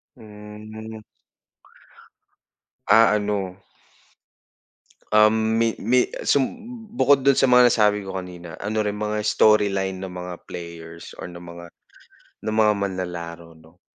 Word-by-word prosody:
Hmm. 110 +1 -11 1.8
Ah, 110 +2 +6
ano. 100 -3 -3 1.5
Um, 110 +1 +4
mi 115 -1 +1
mi 125 +4 +3 0.2
sum 140 - +3 0.5
bukod 140 - +3
dun 140 -1 +5
sa 135 - +3
mga 125 0 +7
nasabi 105 -3 +2
ko 95 - -6
kanina, 90 -2 -7
ano 110 +2 -2
rin 105 0 -2
mga 105 0 -2
storyline 100 -3 +2
ng 95 -1 -7
mga 90 0 -6
players 85 -1 -9
or - - -6
ng 85 0 -11
mga, 85 0 -10 0.8
ng 110 - -1
mga 110 -1 +4
manlalaro, 85 -4 -5
'no. 80 +2 -22
105 Hz, 120 wpm, -23 LUFS, 90-110 Hz, 1.8 s, mga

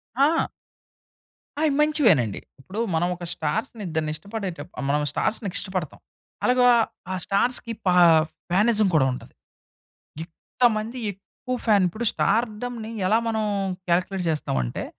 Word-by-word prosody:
ఆ! 290 +5 +3 1.1
అయి 315 - +3
మంచివేనండి. 225 - +3 0.2
ఇప్పుడు 195 +10 -6
మనమొక 175 +2 -1
స్టార్స్‌ని 210 +8 -3
ఇద్దరిని 155 -2 -2
ఇష్టపడేటప్పుడు 185 - -6
మనం 150 +1 +2
స్టార్స్‌ని 215 +1 -1
ఇష్టపడతాం. 185 -6 -4 0.4
అలాగా 250 0 +4 0.4
ఆ - - -1
స్టార్స్‌కి 230 +3 0
పా 180 - +4 0.6
ఫానిజం 210 +3 +4
కూడా 135 -4 +4
ఉంటది. 125 - -9 0.9
ఇంతమంది 220 +6 -1
ఎక్కువ 250 +6 -7
ఫాన్ 205 -4 +5
ఇప్పుడు 220 +7 -4
స్టార్డమ్‌ని 230 0 -1 0.2
ఎలా 220 +3 +4
మనం 220 -1 0 0.5
కాలిక్యులేట్ 180 +1 0
చేస్తామంటే 65 - -2
205 Hz, 110 wpm, -24 LUFS, 170-235 Hz, 1.1 s, ఫాన్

